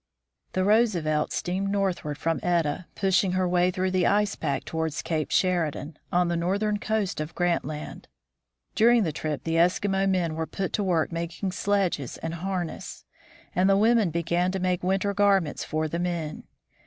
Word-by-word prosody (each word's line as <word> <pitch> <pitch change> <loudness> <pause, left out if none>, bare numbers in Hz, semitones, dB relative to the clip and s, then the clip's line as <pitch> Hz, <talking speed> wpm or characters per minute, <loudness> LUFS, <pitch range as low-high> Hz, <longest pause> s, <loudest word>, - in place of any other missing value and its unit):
The 185 - +1
Roosevelt 185 -8 +2
steamed 190 +3 -2
northward 190 -7 -1
from 165 +2 -1
Etah, 170 -1 0
pushing 190 -1 +2
her 185 0 +1
way 180 0 +3
through 185 0 -1
the 185 -1 +2
ice 205 0 +2
pack 140 -4 -2
towards 160 -2 -2
Cape 155 -2 -1
Sheridan, 160 -4 0
on 175 0 +3
the 170 - 0
northern 200 +5 0
coast 215 -7 -1
of 155 +1 -6
Grant 175 -1 +1
Land. 150 +1 -7 0.7
During 235 0 +5
the 165 - -1
trip 155 -1 -4
the 165 0 0
Eskimo 195 +3 +2
men 175 -4 +1
were 160 0 -3
put 195 -2 -4
to 210 - 0
work 175 -4 +1
making 170 +3 -3
sledges 185 - -1
and 165 0 -5
har 180 +1 -2
ness, 160 - -9 0.5
and 185 +2 +3
the 195 - +5
women 220 -2 +4
began 170 +2 0
to 190 - -1
make 180 -1 0
winter 195 +2 0
garments 195 -6 +2
for 155 0 -1
the 170 +3 -3
men. 170 -3 -3
180 Hz, 175 wpm, -26 LUFS, 165-195 Hz, 0.7 s, During